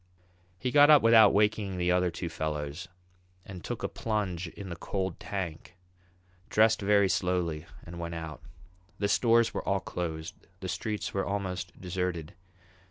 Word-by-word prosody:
He 125 Hz, +5 st, -2 dB
got 145 Hz, +1 st, +7 dB
up 150 Hz, -4 st, +8 dB
without 115 Hz, -3 st, +7 dB
waking 105 Hz, -2 st, +1 dB
the 90 Hz, 0 st, +1 dB
other 90 Hz, 0 st, +2 dB
two 85 Hz, +1 st, -5 dB
fellows 75 Hz, +1 st, -4 dB, 0.6 s
and 90 Hz, -3 st, -9 dB
took -, -, -5 dB
a -, -, +1 dB
plunge 95 Hz, -6 st, -2 dB
in 95 Hz, +3 st, -9 dB
the 85 Hz, -, -5 dB
cold 95 Hz, 0 st, -3 dB
tank, 95 Hz, -4 st, -5 dB, 0.7 s
dressed 110 Hz, 0 st, +4 dB
very 100 Hz, 0 st, +4 dB
slowly, 90 Hz, -4 st, -1 dB, 0.2 s
and 85 Hz, +1 st, -8 dB
went 85 Hz, 0 st, -4 dB
out. 80 Hz, -2 st, -7 dB, 0.6 s
The 100 Hz, -, 0 dB
stores 115 Hz, +2 st, +3 dB
were -, -, -3 dB
all 100 Hz, 0 st, +1 dB
closed, 80 Hz, -3 st, -5 dB, 0.3 s
the -, -, -5 dB
streets 105 Hz, -1 st, -3 dB
were 95 Hz, -, 0 dB
almost 95 Hz, -2 st, -4 dB
deserted. 90 Hz, -2 st, -3 dB
90 Hz, 155 wpm, -29 LUFS, 85-105 Hz, 0.7 s, up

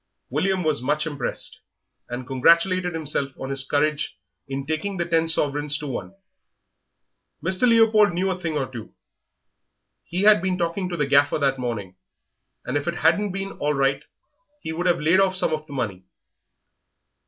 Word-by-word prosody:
William 190 Hz, -1 st, 0 dB
was 155 Hz, -5 st, +1 dB
much 150 Hz, +4 st, 0 dB
impressed, 145 Hz, -5 st, -3 dB, 0.5 s
and 125 Hz, +1 st, -5 dB
congratulated 170 Hz, +7 st, +3 dB
himself 145 Hz, -3 st, -2 dB
on 135 Hz, +1 st, -5 dB
his 135 Hz, -1 st, 0 dB
courage 150 Hz, +2 st, 0 dB, 0.3 s
in 135 Hz, 0 st, -4 dB
taking 160 Hz, +6 st, -3 dB
the 170 Hz, -, -1 dB
ten 165 Hz, -1 st, +2 dB
half -, -, -2 dB
sovereigns 145 Hz, -2 st, 0 dB
to 150 Hz, -, -7 dB
one. 140 Hz, +7 st, -5 dB, 1.3 s
Mr. 190 Hz, +6 st, +3 dB
Leopold 220 Hz, -3 st, +5 dB
knew 185 Hz, +2 st, 0 dB
a 185 Hz, -, -4 dB
thing 165 Hz, -4 st, -2 dB
or 135 Hz, -, 0 dB
two; 120 Hz, -4 st, -10 dB, 1.1 s
he 180 Hz, +3 st, -2 dB
had 210 Hz, -3 st, +6 dB
been 185 Hz, 0 st, 0 dB
talking 175 Hz, +2 st, -2 dB
to 175 Hz, -, -4 dB
the 150 Hz, -, +1 dB
Gaffer 140 Hz, +1 st, +3 dB
that 135 Hz, -3 st, 0 dB
morning, 105 Hz, -7 st, -4 dB, 0.7 s
and -, -, -1 dB
if 145 Hz, -, -4 dB
it 170 Hz, -, -1 dB
hadn't 175 Hz, +6 st, +2 dB
been 195 Hz, +1 st, -4 dB
all 150 Hz, 0 st, 0 dB
right 135 Hz, +1 st, +1 dB, 0.6 s
he 160 Hz, -, -4 dB
would 175 Hz, +3 st, -2 dB
have 175 Hz, -1 st, +3 dB
laid 165 Hz, +5 st, +3 dB
off 190 Hz, -1 st, +3 dB
some 185 Hz, -, +2 dB
of 155 Hz, 0 st, -4 dB
the 145 Hz, -, -10 dB
money. 100 Hz, -8 st, -3 dB
155 Hz, 175 wpm, -23 LUFS, 140-185 Hz, 1.3 s, had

